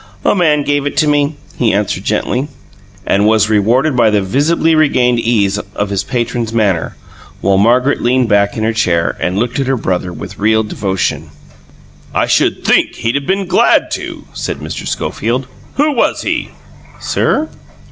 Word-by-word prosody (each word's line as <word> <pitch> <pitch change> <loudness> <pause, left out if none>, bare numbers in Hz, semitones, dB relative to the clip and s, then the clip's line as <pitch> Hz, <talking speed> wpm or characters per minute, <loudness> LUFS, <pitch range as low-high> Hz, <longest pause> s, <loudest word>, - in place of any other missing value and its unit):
"A - - +4
man 155 -6 +2
gave 145 0 0
it - - -5
to 155 - +3
me," 145 0 +1 0.2
he 120 -3 +3
answered 100 -2 -1
gently, 125 +6 -1 0.6
and 100 +2 +2
was 110 -1 +3
rewarded 120 +8 +2
by 120 -3 +4
the 105 -2 +1
visibly 150 - +1
regained 125 -6 +3
ease 105 -4 +1 0.2
of 100 0 -2
his 100 -1 -1
patron's 120 -3 -2
manner, 100 -7 0 0.4
while 95 -1 +2
Margaret 125 +6 +2
leaned 125 0 +2
back 100 -1 +2
in 110 - -2
her 110 +1 +1
chair 85 -6 0
and 90 +2 -1
looked 120 +4 -1
at 135 - -1
her 135 -1 +1
brother 90 -4 -2
with 95 +2 -9
real 110 +2 +2
devotion. 95 -3 -2 0.9
"I - - +2
should - - +1
think - - +2
he'd 115 0 -2
have 140 0 -2
been 195 +1 0
glad - - +3
to," - - -5
said - - -4
Mr. - - -6
Schofield. 120 +5 -2 0.3
"Who 300 +2 +2
was 245 - 0
he?" - - -2 0.5
"Sir?" 315 - 0
115 Hz, 170 wpm, -14 LUFS, 100-140 Hz, 0.9 s, A